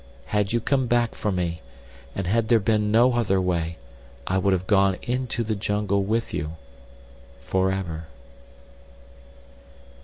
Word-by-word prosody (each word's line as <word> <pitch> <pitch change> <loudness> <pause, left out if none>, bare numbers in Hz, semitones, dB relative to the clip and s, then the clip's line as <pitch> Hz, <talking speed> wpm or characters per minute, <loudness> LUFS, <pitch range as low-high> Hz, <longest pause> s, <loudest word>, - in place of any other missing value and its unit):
Had 105 -2 0
you 120 - +2
come 130 +2 +1
back 120 -1 +2
for 105 - -2
me, 85 -3 -2 0.5
and 100 - -2
had 110 +5 +1
there 115 0 +5
been 105 0 +1
no 120 +4 +5
other 105 -5 +2
way, 85 -3 -1 0.5
I 95 +1 +1
would 100 +1 +2
have 95 -1 0
gone 95 -1 +3
into 125 -1 -1
the 110 0 -1
jungle 105 -1 0
with 110 +4 -1
you—forever." 70 +5 -5
95 Hz, 130 wpm, -25 LUFS, 85-110 Hz, 0.5 s, there